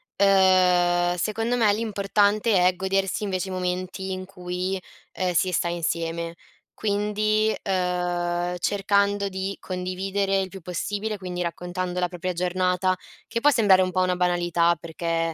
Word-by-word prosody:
ehm, 180 Hz, -2 st, +4 dB
secondo 225 Hz, +6 st, -1 dB
me 215 Hz, -4 st, +4 dB
l'importante 205 Hz, -1 st, +2 dB
è 185 Hz, -, +2 dB
godersi 190 Hz, +2 st, -1 dB
invece 190 Hz, -1 st, -2 dB
i -, -, -5 dB
momenti 185 Hz, +1 st, -3 dB
in 185 Hz, 0 st, -4 dB
cui, 185 Hz, 0 st, -4 dB, 0.3 s
ehm, 185 Hz, -1 st, -1 dB
si 185 Hz, +2 st, +2 dB
sta 175 Hz, -, +1 dB
insieme. 170 Hz, 0 st, -2 dB, 0.4 s
Quindi, 215 Hz, +1 st, +1 dB
ehm, 180 Hz, -2 st, -1 dB
cercando 200 Hz, +1 st, +1 dB
di 190 Hz, +1 st, -4 dB
condividere 195 Hz, +2 st, -1 dB
il 190 Hz, -, -3 dB
più 195 Hz, 0 st, -10 dB
possibile, 205 Hz, +5 st, -3 dB
quindi 180 Hz, -2 st, -5 dB
raccontando 180 Hz, +1 st, -3 dB
la 180 Hz, -, +1 dB
propria 180 Hz, +1 st, -4 dB
giornata, 180 Hz, +1 st, +1 dB, 0.3 s
che 230 Hz, -, -2 dB
può 290 Hz, -, +6 dB
sembrare 205 Hz, -7 st, +5 dB
un 185 Hz, -, -2 dB
po' 185 Hz, -, +1 dB
una 185 Hz, 0 st, +1 dB
banalità 175 Hz, -1 st, +2 dB
perché, 165 Hz, 0 st, -2 dB
185 Hz, 140 wpm, -25 LUFS, 180-200 Hz, 0.4 s, può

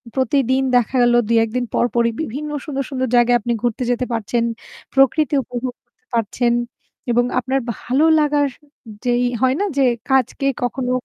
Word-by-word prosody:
প্রতিদিন 265 Hz, -1 st, +1 dB
দেখা 245 Hz, +1 st, +2 dB
গেল 240 Hz, 0 st, +4 dB
২-১ 225 Hz, -1 st, +2 dB
দিন 250 Hz, -1 st, 0 dB
পর, -, -, +2 dB
পরই 235 Hz, 0 st, +2 dB
বিভিন্ন 300 Hz, +2 st, -4 dB, 0.2 s
সুন্দর, 275 Hz, -3 st, -3 dB
সুন্দর 260 Hz, -2 st, -2 dB
জায়গায় 240 Hz, 0 st, +5 dB
আপনি 235 Hz, +2 st, -1 dB
ঘুরতে 240 Hz, +1 st, -1 dB
যেতে 245 Hz, +1 st, -1 dB
পারছেন। 230 Hz, +1 st, -1 dB, 0.5 s
প্রকৃতি 280 Hz, +3 st, +3 dB
উপভোগ 245 Hz, +1 st, -5 dB
করতে 445 Hz, -, -47 dB
পারছেন। 235 Hz, +2 st, 0 dB, 0.6 s
এবং 245 Hz, +1 st, +3 dB
আপনার 265 Hz, +2 st, -1 dB, 0.2 s
ভালো 265 Hz, +9 st, 0 dB, 0.2 s
লাগার 295 Hz, -1 st, +2 dB, 0.6 s
যেই 245 Hz, 0 st, +2 dB, 0.2 s
হয় 260 Hz, 0 st, +3 dB
না 410 Hz, -, +1 dB
যে 275 Hz, -, +4 dB, 0.3 s
কাজকে 265 Hz, +1 st, +1 dB, 0.2 s
কখনো 250 Hz, +1 st, -2 dB
250 Hz, 160 wpm, -20 LUFS, 240-270 Hz, 0.6 s, জায়গায়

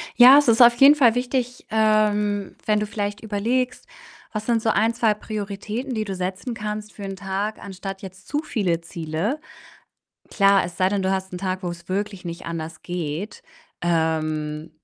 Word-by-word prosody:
Ja, 255 Hz, +3 st, +9 dB
es 290 Hz, -, +4 dB
ist 230 Hz, +1 st, +5 dB
auf 240 Hz, 0 st, +8 dB
jeden 275 Hz, +3 st, +8 dB
Fall 245 Hz, -6 st, +4 dB
wichtig, 250 Hz, 0 st, -2 dB
ähm, 210 Hz, -2 st, +1 dB
wenn 210 Hz, -1 st, +2 dB
du 210 Hz, -, -1 dB
vielleicht 205 Hz, 0 st, -4 dB
überlegst, 230 Hz, +4 st, -1 dB, 0.5 s
was 215 Hz, 0 st, -4 dB
sind 230 Hz, -1 st, +1 dB
so 225 Hz, -, +1 dB
1, 225 Hz, +1 st, +2 dB
2 230 Hz, -2 st, +2 dB
Prioritäten, 210 Hz, +4 st, -5 dB
die 220 Hz, -2 st, -2 dB
du 195 Hz, -2 st, -4 dB
setzen 185 Hz, +6 st, -4 dB
kannst 210 Hz, -1 st, -5 dB
für 205 Hz, -, -9 dB
'n 195 Hz, 0 st, -5 dB
Tag, 195 Hz, +2 st, -3 dB
anstatt 195 Hz, 0 st, -7 dB
jetzt 185 Hz, 0 st, -11 dB
zu 290 Hz, -, -1 dB
viele 180 Hz, -, -1 dB
Ziele. 170 Hz, -, -3 dB, 0.9 s
Klar, 195 Hz, -1 st, +4 dB
es 175 Hz, -1 st, -7 dB
sei 185 Hz, -, +3 dB
denn, 200 Hz, 0 st, -1 dB
du 190 Hz, -, +1 dB
hast 190 Hz, -1 st, -2 dB
'n 180 Hz, -, -4 dB
Tag, 185 Hz, 0 st, -3 dB
wo's 175 Hz, -1 st, -6 dB
wirklich 195 Hz, 0 st, -3 dB
nicht 170 Hz, 0 st, -7 dB
anders 165 Hz, -1 st, -6 dB
geht. 175 Hz, +2 st, -4 dB, 0.4 s
Ähm, 155 Hz, -2 st, -1 dB
205 Hz, 180 wpm, -23 LUFS, 180-220 Hz, 0.9 s, Ja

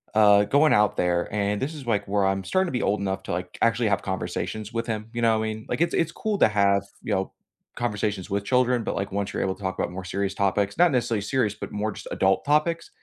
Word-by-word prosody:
uh, 105 Hz, -1 st, +6 dB
going 145 Hz, +5 st, +4 dB
out 105 Hz, 0 st, +3 dB
there, 90 Hz, -1 st, 0 dB
and 100 Hz, 0 st, -1 dB
this 150 Hz, +4 st, -3 dB
is 140 Hz, -4 st, -9 dB
like 105 Hz, -4 st, 0 dB
where 100 Hz, -1 st, +1 dB
I'm 95 Hz, 0 st, 0 dB
starting 185 Hz, -, +1 dB
to -, -, -4 dB
be -, -, -2 dB
old 105 Hz, -, +1 dB
enough 95 Hz, -1 st, -2 dB
to -, -, -6 dB
like 90 Hz, +1 st, -5 dB
actually 115 Hz, -1 st, +2 dB
have 100 Hz, -, +1 dB
conversations 95 Hz, +3 st, -4 dB
with 115 Hz, +1 st, -2 dB
him, 110 Hz, -1 st, -3 dB
you 120 Hz, -, -3 dB
know 115 Hz, -1 st, +3 dB
what 110 Hz, -, -1 dB
I 110 Hz, -, -2 dB
mean? 110 Hz, 0 st, -10 dB
Like -, -, -2 dB
it's 170 Hz, -, +2 dB
it's 165 Hz, -1 st, +1 dB
cool 215 Hz, -2 st, -2 dB
to -, -, +6 dB
have, 100 Hz, -2 st, +3 dB, 0.2 s
you 105 Hz, -, -2 dB
know, 95 Hz, 0 st, -1 dB, 0.4 s
conversations 105 Hz, -5 st, -2 dB
with 100 Hz, 0 st, -2 dB
children, 125 Hz, 0 st, +2 dB
but -, -, -3 dB
like 100 Hz, 0 st, -3 dB
once 100 Hz, 0 st, -2 dB
you're -, -, -2 dB
able 95 Hz, -, 0 dB
to 100 Hz, -, -17 dB
talk 95 Hz, -1 st, -3 dB
about -, -, -2 dB
more 95 Hz, +1 st, -6 dB
serious 100 Hz, +2 st, -2 dB
topics, 100 Hz, -, 0 dB
not 175 Hz, -3 st, +6 dB
necessarily 115 Hz, -4 st, 0 dB
serious, 110 Hz, -2 st, 0 dB
but 105 Hz, -, -8 dB
more 105 Hz, +1 st, -2 dB
just -, -, -10 dB
adult 95 Hz, 0 st, +1 dB
topics, 155 Hz, +3 st, +1 dB
105 Hz, 265 wpm, -25 LUFS, 100-120 Hz, 0.4 s, uh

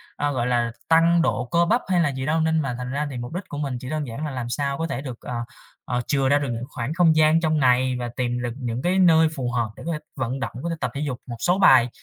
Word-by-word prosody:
à, 145 Hz, 0 st, -1 dB
gọi 125 Hz, -2 st, -1 dB
là, 120 Hz, -1 st, +1 dB, 0.2 s
tăng 165 Hz, +1 st, +5 dB
độ 130 Hz, -6 st, 0 dB
cơ 170 Hz, 0 st, +4 dB
bắp 230 Hz, +7 st, +2 dB
hay 180 Hz, -2 st, +2 dB
là 155 Hz, -, +2 dB
gì 130 Hz, -1 st, -4 dB
đâu. 160 Hz, +2 st, +1 dB
Nên 160 Hz, 0 st, +2 dB
mà 135 Hz, -4 st, -3 dB
thành 125 Hz, 0 st, -5 dB
ra 145 Hz, +2 st, -1 dB
thì 135 Hz, -, -6 dB
mục 120 Hz, +4 st, -6 dB
đích 185 Hz, -, -3 dB
của 145 Hz, -, -6 dB
mình 140 Hz, -4 st, -2 dB
chỉ 130 Hz, -, -7 dB
đơn 155 Hz, -1 st, -2 dB
giản 125 Hz, +7 st, -5 dB
là 150 Hz, -, -4 dB
làm 125 Hz, -2 st, -4 dB
sao 140 Hz, +2 st, -1 dB
có 165 Hz, +2 st, -2 dB
thể 135 Hz, -, -4 dB
được, 130 Hz, -4 st, -7 dB
ờ, -, -, -6 dB, 0.5 s
ờ, 125 Hz, -1 st, -1 dB
chừa 135 Hz, -2 st, +1 dB
ra 145 Hz, +1 st, +4 dB
được 140 Hz, -2 st, -3 dB
những 115 Hz, 0 st, -4 dB
khoảng 125 Hz, +2 st, -4 dB
không 165 Hz, -2 st, +4 dB
gian 155 Hz, +1 st, +5 dB
trong 155 Hz, -2 st, +1 dB
ngày 130 Hz, -1 st, +3 dB
và 120 Hz, -1 st, -3 dB
tìm 125 Hz, -1 st, -1 dB
được 120 Hz, -1 st, -3 dB
những 125 Hz, -2 st, -3 dB
cái 180 Hz, +3 st, +1 dB
nơi 160 Hz, -3 st, +6 dB
phù 125 Hz, -2 st, -2 dB
hợp 120 Hz, -2 st, 0 dB
để -, -, -10 dB
có 170 Hz, -, -2 dB
thể 150 Hz, -, -3 dB, 0.2 s
vận 130 Hz, 0 st, -3 dB
động, -, -, -3 dB
có 170 Hz, -, -2 dB
thể 165 Hz, -, -2 dB
tập -, -, -2 dB
thể 140 Hz, -, -4 dB
dục 135 Hz, -5 st, -3 dB
một 120 Hz, -2 st, -6 dB
số 180 Hz, +8 st, +1 dB
bài 130 Hz, -10 st, +6 dB
140 Hz, 305 wpm, -23 LUFS, 125-160 Hz, 0.5 s, nơi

